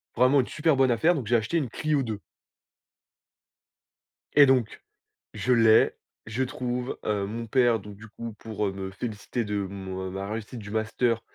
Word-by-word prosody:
vraiment 130 +3 +5
une 125 - -5
super 155 -1 +1
bonne 130 -1 +4
affaire, 160 +10 +3
donc 135 -7 -3
j'ai 120 - +3
acheté 110 +9 -1
une 140 -7 -1
Clio 150 +3 0
2. 110 -4 -4 2.2
Et 145 - +9
donc 130 -5 +1 0.5
je 125 - +1
l'ai, 115 -2 +6 0.3
je 115 +4 -1
trouve, 125 0 -3
heu, 105 -2 0
mon 115 +3 -5
père 120 -1 +3
donc 105 0 -10
du 105 +3 -12
coup 115 +1 -8
pour, 110 -2 -3
heu, - - -1
me 95 0 -6
féliciter 110 +3 -4
de 105 -1 -2
mon, 95 -1 -5
heu - - -4
ma 95 +1 -4
réussite 110 +2 -5
du 100 -2 -9
master, 110 +1 0
115 Hz, 180 wpm, -27 LUFS, 105-125 Hz, 2.2 s, Et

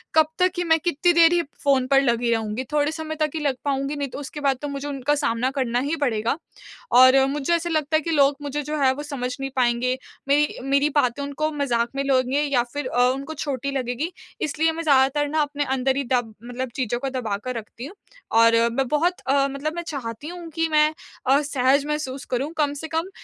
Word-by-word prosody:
कब 315 -1 +6
तक 365 0 +4
ही 355 - 0
मैं 325 -1 +3
कितनी 345 +2 +2
देर 340 +1 +5 0.2
फोन 270 -3 +3
पर 275 0 +4
लगी 235 -2 +1
रहूँगी? 225 +2 -1
थोड़े 295 0 +2
समय 315 -1 -5
तक 305 -2 +1
ही - - -1
लग 280 -3 0
पाऊँगी। 275 +1 -1
नहीं 285 -1 -2
तो 250 - -7
उसके 290 +1 -7
बाद 275 -2 +2
तो 295 - -3
मुझे 280 0 -5
उनका 280 +1 0
सामना 250 -2 0
करना 245 -2 0
ही 325 - 0
पड़ेगा। 225 +3 0 0.6
और 260 +1 +7
मुझे 290 +3 -1
ऐसा 340 +1 -2
लगता 310 -1 0
है - - -1
कि 330 - -3
लोग 285 -2 +4
मुझे 290 0 -3
जो 300 +2 -3
है 260 -1 +4
वो 290 +2 -6
समझ 255 -4 -4
नहीं 270 0 -3
पाएँगे, 250 0 +1 0.3
मेरी 290 +1 +2
मेरी 280 +2 +3
बातें 280 -1 +1
उनको 280 +1 -7
मज़ाक 245 -6 0
में 275 - -1
लेंगे 265 0 +2
या 280 -4 +2
फिर 290 -2 -3
अ, 245 - -2
उनको 275 +4 -3
छोटी 280 -3 -3
लगेगी। 265 +4 -2 0.3
इसलिए 320 +2 +1
मैं 330 +1 -5
ज़्यादातर 280 0 +3
ना 310 +2 0
अपने 290 0 -1
अंदर 265 0 +1
ही 280 - 0
दब 245 -3 0
मतलब 245 +1 -5
चीज़ों 240 -3 -1
को 270 +1 -3
दबाकर 250 -1 -3
रखती 230 +2 -8
हूँ। 335 +8 -10 0.5
और 230 0 +6 0.2
मैं 265 +2 0
बहुत 335 +6 +1
अ, 275 +1 +3
मतलब 285 +3 -3
मैं 345 - -3
चाहती 255 -2 -5
हूँ 345 0 -8
कि 325 0 +1
मैं 305 0 +4 0.3
अ, 275 +2 +5
सहज़ 280 0 +2
महसूस 285 -3 -3
करूँ। 270 +5 -1
कम 290 -2 +1
से 320 - -5
कम 325 +3 -2
280 Hz, 220 wpm, -23 LUFS, 255-300 Hz, 0.6 s, और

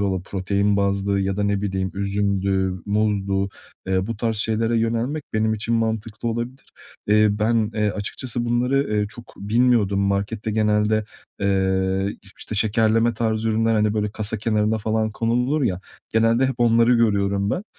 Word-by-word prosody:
ola 95 -3 -1
protein 100 +2 0
bazlı 100 0 +1
ya 95 0 -1
da, 105 - 0
ne 100 -1 0
bileyim, 95 -2 -2
üzümdü, 100 -1 0
muzdu, 100 -2 0 0.4
eee, 95 +1 0
bu 115 -2 -4
tarz 115 0 -1
şeylere 115 +2 +1
yönelmek 115 +6 -1
benim 110 0 +1
için 115 +2 -2
mantıklı 110 0 -2
olabilir. 120 +3 -4 0.4
Eee, 105 +1 +4
ben, 110 +1 +1
eee, 105 -1 +1
açıkçası 120 +4 -3
bunları, 125 +4 +1
eee, 105 0 +1
çok 120 +2 -12
bilmiyordum. 105 -1 +2
Markette 100 +3 -1
genelde, 105 0 +1 0.4
eee, 95 0 0
iş 100 0 -16
işte 110 - -4
şekerleme 110 +2 +2
tarzı 110 -1 -1
ürünler, 115 +1 +2
hani 105 0 +2
böyle 105 -1 -1
kasa 110 +1 -2
kenarına 110 0 +1
falan 110 +1 0
konulur 125 +7 0
ya, 95 -6 0 0.3
genelde 115 +3 +3
hep 130 - -2
onları 115 +1 +4
görüyorum 100 -3 +1
ben. 185 - -2
110 Hz, 155 wpm, -22 LUFS, 100-115 Hz, 0.4 s, Eee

